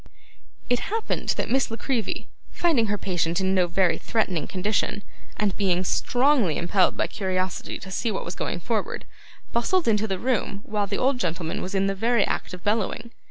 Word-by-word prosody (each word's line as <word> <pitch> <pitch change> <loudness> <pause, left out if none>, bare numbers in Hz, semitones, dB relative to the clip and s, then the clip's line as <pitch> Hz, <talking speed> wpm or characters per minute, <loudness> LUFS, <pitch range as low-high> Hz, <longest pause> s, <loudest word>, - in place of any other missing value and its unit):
It 245 0 +2
happened 445 +2 -2
that - - -2
Miss 265 +1 +2
La 225 - -4
Creevy, 245 -5 -2 0.2
finding 295 -10 +2
her 205 0 0
patient 175 -3 0
in 190 0 +1
no 185 -2 +3
very 175 -1 +2
threatening 190 -8 0
condition, 205 +2 -1 0.3
and 210 -2 +1
being 185 -3 +2
strongly 245 - +2
impelled 180 +2 +2
by - - +2
curiosity 185 -2 -2
to 190 - -9
see 230 +4 0
what 195 - -3
was 170 - -4
going 175 - -3
forward, 225 0 -2 0.5
bustled 310 +8 +2
into 220 -1 +3
the 190 -2 -1
room 225 -3 -1
while 210 -1 -1
the 200 - -2
old 260 0 +2
gentleman 170 -4 -2
was 190 +2 -4
in 195 0 +3
the 195 - +1
very 225 +1 +2
act - - -2
of 180 -1 -8
bellowing. 220 +2 0
200 Hz, 185 wpm, -25 LUFS, 185-235 Hz, 0.5 s, no